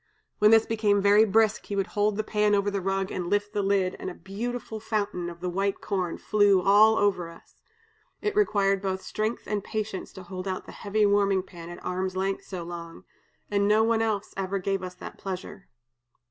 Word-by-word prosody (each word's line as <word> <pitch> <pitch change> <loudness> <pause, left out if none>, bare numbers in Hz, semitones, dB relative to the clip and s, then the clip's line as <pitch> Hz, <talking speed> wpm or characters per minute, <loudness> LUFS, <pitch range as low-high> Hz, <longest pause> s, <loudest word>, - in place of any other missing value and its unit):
When 210 - +6
this 225 0 +6
became 210 -2 +2
very 205 +2 +5
brisk, 220 +1 +2
he 200 - -3
would 195 -1 +1
hold 205 +1 0
the 215 - 0
pan 210 -1 +2
over 200 0 +1
the 200 -1 -2
rug 195 0 -1
and 180 -1 -3
lift 205 0 0
the 205 - 0
lid, 195 -2 +1
and - - -4
a 180 - -8
beautiful 220 +3 -5
fountain 205 -5 -2
of 170 0 -11
the 180 - -2
white 195 +2 -1
corn 185 -4 -2
flew 205 -2 +3
all 205 +4 +6
over 190 -4 +1
us. 170 - -17 0.6
It 420 -1 -2
required 200 - +2
both 190 -1 -2
strength 215 +2 -2
and 205 -2 -2
patience 215 -3 -4
to 190 - -10
hold 185 +1 -6
out 185 -1 -3
the - - -10
heavy 210 +1 0
warming 200 -2 +3
pan 170 -2 -11
at 175 - -10
arm's 185 +1 -2
length 195 +1 -1
so 185 -3 -6
long, 170 -1 -8 0.5
and 200 0 +2
no 215 +1 +4
one 225 0 +2
else 215 -3 -1
ever 195 0 -2
gave 195 0 -1
us 180 -1 -7
that - - -10
pleasure. 195 +1 -6
200 Hz, 205 wpm, -27 LUFS, 185-210 Hz, 0.6 s, When